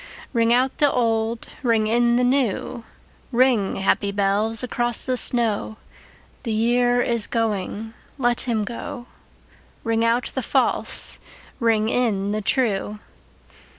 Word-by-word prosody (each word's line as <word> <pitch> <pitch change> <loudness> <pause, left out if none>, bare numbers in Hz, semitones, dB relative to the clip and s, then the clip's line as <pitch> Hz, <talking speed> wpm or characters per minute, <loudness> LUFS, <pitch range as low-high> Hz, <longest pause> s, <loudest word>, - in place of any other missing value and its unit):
Ring 230 -1 +2
out 255 +2 +1
the 290 -2 +4
old, 225 -1 -1
ring 230 -4 +2
in 235 +2 +2
the 250 - +2
new, 250 -2 0 0.5
Ring, 245 -5 +2
happy 195 +1 0
bells, 205 +3 +1
across 240 -1 +1
the 255 - 0
snow: 225 -3 +1 0.6
The 235 - -4
year 245 +2 +2
is 235 -3 -1
going, 220 -1 -3 0.2
let 240 -3 0
him 220 -2 0
go; 235 +3 -7 0.8
Ring 225 0 0
out 230 +2 +1
the - - -2
false, - - +1 0.4
ring 225 -3 +2
in 210 -5 0
the 215 +1 -2
true. 210 -3 -1
230 Hz, 125 wpm, -22 LUFS, 215-245 Hz, 0.8 s, the